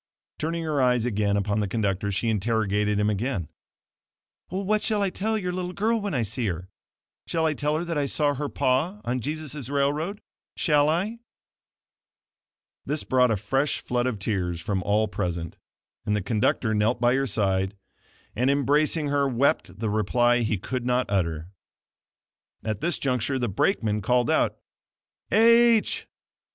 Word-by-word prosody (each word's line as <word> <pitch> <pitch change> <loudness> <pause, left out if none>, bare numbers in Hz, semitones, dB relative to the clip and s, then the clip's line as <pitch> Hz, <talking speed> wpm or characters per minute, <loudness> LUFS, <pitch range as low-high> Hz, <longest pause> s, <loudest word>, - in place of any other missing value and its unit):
Turning 165 +2 -2
her 150 -3 0
eyes 125 -2 +3
again 105 -3 +1
upon 100 +1 0
the 105 - 0
conductor, 100 -1 -1
she 100 +4 -1
interrogated 105 -1 +1
him 105 - +2
again, 105 - -1 1.0
"What 200 +3 0
shall 210 -2 0
I 195 - 0
tell 220 +4 -1
your 180 -4 -2
little 180 0 -4
girl 225 +3 +1
when 200 -6 -2
I 120 - +1
see 110 +2 -2
her? 90 0 -4 0.6
Shall 165 -1 0
I 155 - +2
tell 150 +1 -1
her 170 - -3
that 165 -3 -1
I 140 - 0
saw 145 0 +1
her 145 +1 -3
pa 155 +11 0
on 125 +1 -1
Jesus' 150 0 -5
railroad? 145 +8 0 0.4
Shall 150 -2 +3
I?" 195 +9 -1 1.6
This 150 +1 -2
brought 125 -1 +3
a 110 - +1
fresh 135 +8 0
flood 125 0 -1
of 125 -4 -2
tears 95 -4 -2
from 95 +2 -2
all 105 +3 +1
present, 85 -4 -3 0.5
and 105 - 0
the 105 - -1
conductor 110 +1 +1
knelt 110 +3 +1
by 120 0 +3
her 135 +1 +1
side, 95 -2 0 0.6
and, 125 +4 +2
embracing 145 +2 +2
her 140 -1 +2
wept 130 +3 +1
the 110 - 0
reply 120 +3 +2
he 110 -3 0
could 125 +6 -4
not 125 +1 +1
utter. 85 -4 -1 1.1
At 110 -1 -3
this 175 - 0
juncture 130 0 0
the 120 -3 -1
brakeman 105 - 0
called 125 +4 +2
out: - - +1 0.7
"H 230 0 +4
125 Hz, 160 wpm, -25 LUFS, 105-150 Hz, 1.6 s, H